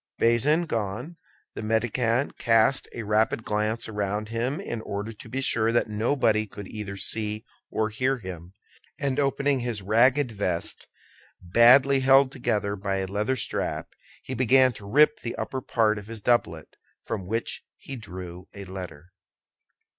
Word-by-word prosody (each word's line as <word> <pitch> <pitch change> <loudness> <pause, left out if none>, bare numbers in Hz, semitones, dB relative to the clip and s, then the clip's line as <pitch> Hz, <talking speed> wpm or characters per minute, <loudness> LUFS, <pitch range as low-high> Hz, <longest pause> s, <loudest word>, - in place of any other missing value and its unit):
Bazin 135 +9 +3
gone, 120 - -4 0.4
the - - -6
mendicant 115 +3 0
cast 115 +3 +3
a 115 - -6
rapid 110 +2 +1
glance 110 +2 -1
around 105 0 -3
him 120 +7 -2
in 120 - -5
order 105 +2 -5
to 105 - -13
be 135 +1 -3
sure 115 -3 +1
that 115 -1 +1
nobody 110 0 +1
could 100 -1 -9
either 105 -2 -6
see 105 +2 -1 0.2
or 110 0 -1
hear 130 +5 0
him, 90 -3 -9 0.4
and 140 0 -1
opening 140 0 +1
his 120 -5 -3
ragged 125 +6 +3
vest, 95 -5 -3 0.5
badly 125 +9 +6
held 135 0 +5
together 110 -6 -1
by 95 0 -2
a 95 0 -1
leather 105 +7 -1
strap, - - -3 0.3
he 130 - -6
began 130 0 +4
to 100 -2 -10
rip 150 +5 +4
the 115 - -5
upper 130 - -4
part 110 -4 +1
of 105 - -12
his 115 0 -6
doublet, 85 -9 0 0.3
from 95 - -4
which 115 +3 -2
he 135 - -8
drew 90 -5 -9
a 100 -1 -8
letter. 90 -3 -9
110 Hz, 155 wpm, -26 LUFS, 100-130 Hz, 0.5 s, badly